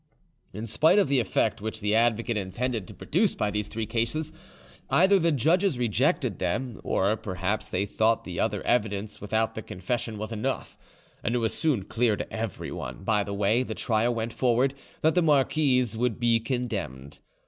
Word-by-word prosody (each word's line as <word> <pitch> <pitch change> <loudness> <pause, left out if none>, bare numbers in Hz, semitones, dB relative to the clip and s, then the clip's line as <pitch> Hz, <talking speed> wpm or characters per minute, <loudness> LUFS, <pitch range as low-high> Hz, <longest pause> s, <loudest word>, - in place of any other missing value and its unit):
In 105 +4 -6
spite 155 - +3
of 200 -9 +4
the 140 -2 +3
effect 110 -3 0
which 110 +1 -4
the 105 +1 0
advocate 115 +1 +2
intended 105 +2 -2
to - - -10
produce 170 - +1
by 105 - 0
these 105 0 -2
three 110 +1 -3
cases, 120 +8 -2 0.6
either 190 +3 +5
the 170 -1 +2
judges 165 - +2
rejected 120 -4 +1
them, 125 -3 -2
or 100 +3 +1
perhaps 100 -1 -3
they 95 +2 0
thought 110 +2 +1
the 90 -2 -6
other - - 0
evidence 105 -3 0
without 110 +2 0
the 110 - -5
confession 110 +4 -4
was 110 +2 -5
enough, 115 +5 -3 0.5
and 115 - 0
it - - +3
was 115 -1 0
soon 150 - +1
clear 115 +2 +1
to - - -6
everyone, 110 -3 -5
by 105 0 +2
the 100 0 -5
way 105 +4 +2
the 130 - -4
trial 115 +1 +1
went 115 0 -3
forward, 130 +2 +2 0.3
that 160 +1 +3
the 180 - +3
marquise 135 -5 +2
would 120 0 -1
be 120 -1 +3
condemned. 110 - -4
115 Hz, 180 wpm, -27 LUFS, 105-130 Hz, 0.6 s, either